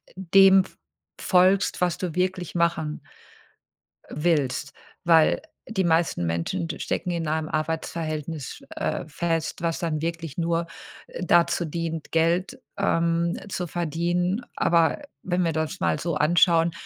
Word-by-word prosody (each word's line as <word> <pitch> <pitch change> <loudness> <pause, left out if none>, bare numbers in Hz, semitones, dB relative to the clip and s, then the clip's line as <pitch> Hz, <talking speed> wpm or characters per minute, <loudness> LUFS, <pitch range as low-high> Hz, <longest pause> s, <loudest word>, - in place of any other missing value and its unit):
dem 190 +1 +6
f 190 - -17 0.4
folgst, 185 +1 +3
was 180 -1 +1
du 175 -4 -3
wirklich 180 -1 -1
machen 170 -3 0 1.1
willst, 145 -4 0 0.3
weil 165 -2 +5 0.2
die 190 -5 -1
meisten 165 - +1
Menschen 85 - -2
stecken 180 - -2
in 170 -1 -2
einem 155 0 -1
Arbeitsverhältnis, 155 -1 -3
äh, - - -2
fest, 165 +1 -2
was 165 -1 -1
dann 160 -4 -2
wirklich 165 -2 -4
nur, 170 0 0 0.4
äh, - - -7
dazu 175 0 +3
dient, 165 0 -4
Geld, 170 +9 +1 0.2
ähm, 170 -3 +1
zu 180 -3 -3
verdienen. 175 +5 -1
Aber 170 - +2 0.2
wenn 180 0 0
wir 165 - 0
das 160 +4 -2
mal - - +1
so 170 -2 -2
anschauen, 165 +2 +4
170 Hz, 130 wpm, -25 LUFS, 160-175 Hz, 1.1 s, dem